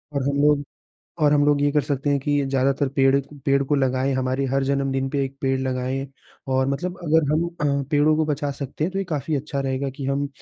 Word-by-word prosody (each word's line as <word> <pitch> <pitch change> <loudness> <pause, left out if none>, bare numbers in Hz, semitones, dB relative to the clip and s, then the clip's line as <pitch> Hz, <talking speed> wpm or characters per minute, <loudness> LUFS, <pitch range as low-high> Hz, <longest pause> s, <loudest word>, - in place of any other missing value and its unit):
और 140 - 0
हम 140 - -1
लोग 145 -1 +3 0.6
और 150 -1 +4
हम 145 -1 +4
लोग 145 -1 +3
ये 145 - +3
कर 150 - +3
सकते 140 +1 -1
हैं 140 - +2
कि 145 +2 -1
ज़्यादातर 135 +1 +1
पेड़ 135 0 +4 0.2
पेड़ 140 0 +3
को 145 - 0
लगाएँ 130 0 +1
हमारी 130 +1 0
हर 135 +1 0
जन्मदिन 135 -1 0
पे 140 -1 0
1 135 0 -7
पेड़ 135 -1 +1
लगाएँ 130 +1 -2 0.5
और 130 0 +2
मतलब 175 +7 -3
अगर 155 -2 +2
हम 160 +2 +2 0.4
अ, - - -2
पेड़ों 150 0 +4
को 160 - +2
बचा 145 -1 -1
सकते 140 +1 -3
हैं 175 - -1
तो 195 - -2
ये 195 - -1
काफ़ी 155 -3 -2
अच्छा 140 0 -3
रहेगा 135 0 -2
कि 140 - -5
हम 140 +1 -1
140 Hz, 230 wpm, -23 LUFS, 135-145 Hz, 0.6 s, और